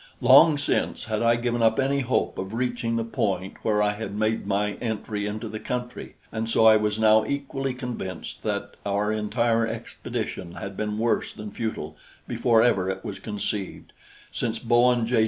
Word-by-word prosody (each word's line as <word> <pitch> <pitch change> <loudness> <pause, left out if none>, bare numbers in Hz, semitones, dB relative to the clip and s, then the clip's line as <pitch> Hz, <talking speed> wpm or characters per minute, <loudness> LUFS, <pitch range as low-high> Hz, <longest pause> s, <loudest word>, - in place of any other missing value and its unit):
Long 140 +5 +7
since, 145 - -1
had 110 -1 -2
I 115 0 +4
given 120 0 -1
up 110 +1 +3
any 135 +1 +2
hope 130 -1 0
of 95 +3 -4
reaching 120 -1 -1
the 115 - 0
point 100 -6 -2
where 105 -1 +2
I 105 0 +2
had 105 -1 -6
made 110 -1 0
my 105 +1 0
entry 105 -2 -3
into 110 +2 -4
the 110 0 -6
country, 125 +1 -5 0.2
and 110 0 -3
so 115 - +3
I 110 -1 +8
was 105 0 +1
now 110 0 +5
equally 135 -2 -3
convinced 125 -7 -6
that - - -3
our 100 +1 0
entire 115 +2 +1
expedition 85 -5 -5
had 100 +1 -7
been 105 0 -2
worse 115 +1 0
than 105 -1 -8
futile 80 -10 -4 0.3
before 115 -2 +3
ever 95 -6 +2
it 95 0 -4
was - - -5
conceived, 105 -2 -4 0.4
since 115 -1 -2
Bowen 120 0 +3
J. 120 0 +2
110 Hz, 175 wpm, -25 LUFS, 105-120 Hz, 0.4 s, I